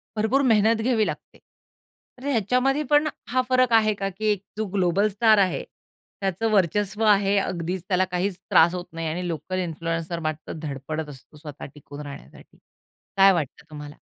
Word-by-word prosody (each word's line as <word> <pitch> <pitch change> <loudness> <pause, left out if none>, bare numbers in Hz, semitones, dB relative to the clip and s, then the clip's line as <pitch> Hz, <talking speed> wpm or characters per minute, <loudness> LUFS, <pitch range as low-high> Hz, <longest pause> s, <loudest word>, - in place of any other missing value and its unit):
भरपूर 220 +6 +2
मेहनत 225 -3 +3
घ्यावी 225 -2 +2
लागते. - - -7 0.8
तर 260 - -11
ह्याच्यामध्ये 255 +4 +1
पण 295 +1 +4 0.2
हा 255 +1 +2
फरक 255 -2 +3
आहे 215 -1 +4
का, 195 -1 -3
की 195 +3 -7
एक 205 -2 -2
जो 220 - -1
ग्लोबल 190 +1 +2
स्टार 215 +2 +4
आहे, 190 -2 +1 0.6
त्याचं 195 +4 -1
वर्चस्व 205 +2 +1
आहे 200 -1 +4
अगदीच, 180 -2 -2
त्याला 185 -1 +2
काहीच 180 +1 -1
त्रास 170 +2 +5
होत 180 -1 -5
नाही 165 0 -4
आणि 175 +3 -3
लोकल 175 +3 -3
इन्फ्लुएन्सर 165 0 -3
मात्र 155 -1 -4
धडपडत 150 +1 -5
असतो 140 +2 -14
स्वतः 150 -2 -9
टिकून 145 0 -10
राहण्यासाठी. 140 - -12 0.6
काय 195 0 +7
वाटतं 160 -1 -4
तुम्हाला? 150 -1 -9
190 Hz, 160 wpm, -24 LUFS, 165-215 Hz, 0.8 s, काय